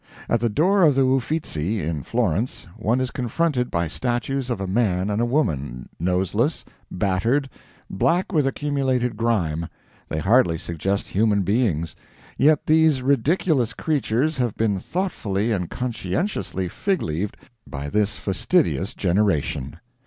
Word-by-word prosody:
At 120 - +2
the 120 +1 +1
door 185 - +3
of 150 -6 +5
the 135 -1 +4
Uffizzi, 125 - 0
in 80 -3 -2
Florence, 115 - -1
one 120 +4 0
is 130 -1 -1
confronted 125 +1 0
by 85 0 0
statues 125 - -2
of 120 - -2
a 95 - -2
man 95 -1 +1
and 105 +2 0
a - - +2
woman, 70 - -1
noseless, 95 - 0 0.2
battered, 100 +9 0 0.4
black 175 - 0
with 150 -4 +3
accumulated 130 -4 0
grime 90 -8 0 0.4
they 80 - -2
hardly 95 -1 +3
suggest 90 +5 -2
human 105 0 +2
beings 95 -6 0 0.4
yet 150 +2 +3
these 155 -4 +4
ridiculous 140 -1 +2
creatures 145 0 0
have 120 -4 -1
been 105 -4 +1
thoughtfully 115 - -2
and 90 -5 -1
conscientiously 110 - -2
fig 190 - -1
leaved 85 +6 -3 0.3
by 70 -1 -5
this 105 +6 0
fastidious 100 - 0
generation. 85 -7 0
115 Hz, 135 wpm, -23 LUFS, 95-135 Hz, 0.4 s, of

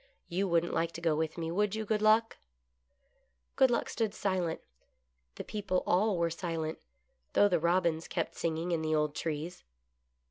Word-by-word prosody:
You 190 +3 0
wouldn't 170 -1 +1
like 165 0 0
to - - -6
go 165 -2 +2
with 160 +1 -2
me, 165 -1 -3
would 205 +3 +1
you. 220 0 -3
Good 210 0 0
Luck 220 +1 +4 0.4
} 60 - -44
" 60 0 -44
Good 265 - +5
Luck 240 - 0
stood 220 -3 -2
silent. 185 -4 -1 0.7
The - - -6
people 195 -3 -2
all 195 +2 +2
were 170 -1 +1
silent, 165 -2 -3 0.5
though 205 - +6
the 180 -4 +2
robins 170 -1 +1
kept - - -2
singing 165 +1 -2
in 165 -2 +1
the 155 0 +1
old 150 -1 +1
trees. 160 +3 -4
170 Hz, 180 wpm, -31 LUFS, 160-200 Hz, 0.7 s, though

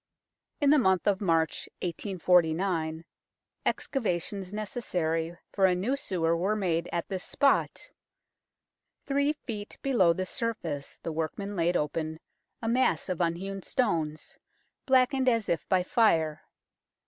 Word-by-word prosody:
In 285 -2 +4
the 300 - +6
month 190 -6 +2
of 200 -2 +2
March, 165 -4 +1
1849, 170 -2 +1 0.6
excavations 195 - -2
necessary 175 -6 -2 0.2
for 195 -2 +4
a 180 - +2
new 210 +10 0
sewer 170 -10 0
were 190 +5 0
made 175 -5 0
at 170 - -2
this 190 -2 -3
spot. 280 -1 +1 1.1
Three 280 +1 +2
feet 215 -8 -7
below 235 -11 +4
the 185 +2 -1
surface 180 - -3
the 165 - -3
workmen 165 +6 -3
laid 175 0 +2
open 155 +1 -2 0.4
a - - -1
mass 235 -9 +2
of 180 -1 -1
unhewn 190 +4 -2
stones, 165 - -2 0.5
blackened 260 0 +4
as 230 -4 +1
if 170 - -1
by 185 -2 +3
fire. 160 -8 +2
185 Hz, 125 wpm, -29 LUFS, 165-220 Hz, 1.1 s, the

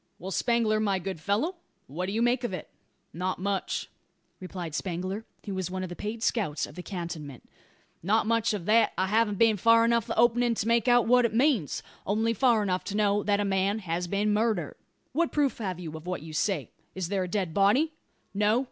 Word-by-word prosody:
"Well, 190 +2 -7
Spangler, 230 -1 +2
my 200 -3 +1
good 185 -1 -5
fellow; 215 - -1 0.3
what 175 +7 -4
do - - -2
you 225 +3 +1
make 240 +1 +2
of 240 - -2
it?" - - -9 0.4
"Not 185 +2 -2
much," 195 0 -2 0.5
replied 180 -3 -6
Spangler, 185 +5 -3 0.2
who 200 - -4
was 185 -1 -3
one 185 0 -4
of 185 - -5
the 175 - -6
paid 220 +4 -5
scouts 195 -13 0
of - - -12
the 180 - -7
cantonment; 170 - -7 0.5
"not 215 +7 +2
much 230 0 +2
of 180 -5 -6
that; 220 +1 +4
I 185 - +2
hav'n't 210 +1 +1
been 225 -1 +4
far 230 +3 +5
enough 235 -1 +1
up - - -1
the - - 0
openin' 240 0 +3
to 215 - -2
make 235 -1 +2
out 245 -1 +5
what 245 +1 +5
it 220 -1 -1
means 245 - +2 0.2
only 220 +3 +1
far 230 -1 +3
enough 185 -2 -1
to 205 - -3
know 205 -1 +2
that 205 0 +1
a 205 - +1
man 195 +1 +1
has 175 -3 -3
been 205 +3 +1
murdered." 210 -7 0 0.4
"What 335 +4 +1
proof 285 -4 +1
have 185 -5 -3
you 160 -3 -6
of 160 +2 -9
what 180 -4 -3
you 160 -1 -9
say? 155 - -1 0.2
Is 185 -2 -3
there 195 -2 0
a - - -3
dead 180 -3 -2
body?" 250 - +3 0.4
"No. 210 +3 +3
205 Hz, 220 wpm, -28 LUFS, 185-230 Hz, 0.5 s, far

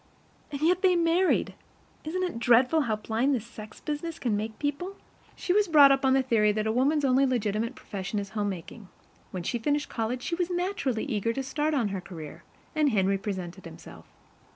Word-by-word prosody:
And 280 0 -5
yet 355 +3 +3
they 370 -2 +4
MARRIED. 345 +2 +2 0.5
Isn't 365 +4 -2
it 350 -10 -3
dreadful 250 +6 +4
how 225 -6 0
blind 230 +6 0
this 230 -3 -4
sex 215 -2 -11
business 305 +2 -4
can 235 -5 -1
make 215 +1 -4
people? 300 +7 -3 0.4
She 360 - -1
was 415 0 +3
brought 290 -4 +7
up 270 0 +2
on 265 -1 +4
the 270 0 +3
theory 220 -5 +3
that 215 0 -1
a 220 - +1
woman's 280 +5 +2
only 265 +1 +4
legitimate 230 -2 0
profession 200 -4 -5
is 200 -1 -3
homemaking. 205 0 -5 0.4
When 180 -2 -5
she 240 +7 -2
finished 290 +4 -1
college, 240 +2 -3
she - - -3
was 350 +1 0
naturally 350 - -1
eager 230 -4 -1
to 270 - -3
start 295 +3 -1
on 235 -7 +1
her 195 -2 -4
career, 160 -5 -9 0.3
and 305 -2 +2
Henry 195 -4 +1
presented 190 -2 -5
himself. 160 - -12
250 Hz, 195 wpm, -27 LUFS, 210-300 Hz, 0.5 s, brought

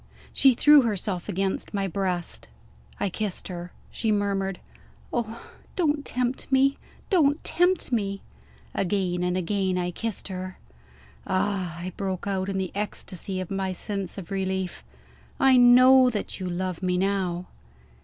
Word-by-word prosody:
She 265 -3 +5
threw 295 +3 +7
herself 200 -5 -2
on 195 +1 0
my 195 -1 0
breast. 180 -2 -3 0.5
I - - +1
kissed 205 -1 -3
her. 175 -1 -6 0.2
She 225 - -1
murmured, 195 -2 0 0.5
"Oh 230 -1 -4 0.2
don't 300 -5 +1
tempt 250 +1 -1
me! 270 +1 +3 0.3
Don't 300 -5 +3
tempt 355 -4 +2
me!" 200 -4 -1 0.5
Again 185 -2 0
and 180 0 0
again, 190 0 0
I 180 0 -1
kissed 225 +4 -4
her. 185 0 -6 0.7
"Ah," 185 -3 -1
I 180 +1 -5
broke 190 -2 -3
out, 195 -1 -1
in 195 - -2
the 190 -1 -2
ecstasy 195 -2 -4
of 185 0 -5
my 190 -1 -1
sense 195 0 -4
of 190 -1 -8
relief, 190 - -2 0.6
"I 265 -1 +6
know 255 +1 +7
that 210 -4 -4
you 185 -1 -3
love 180 0 -3
me, 180 -1 +1
now!" 185 -2 0
195 Hz, 145 wpm, -26 LUFS, 185-230 Hz, 0.7 s, threw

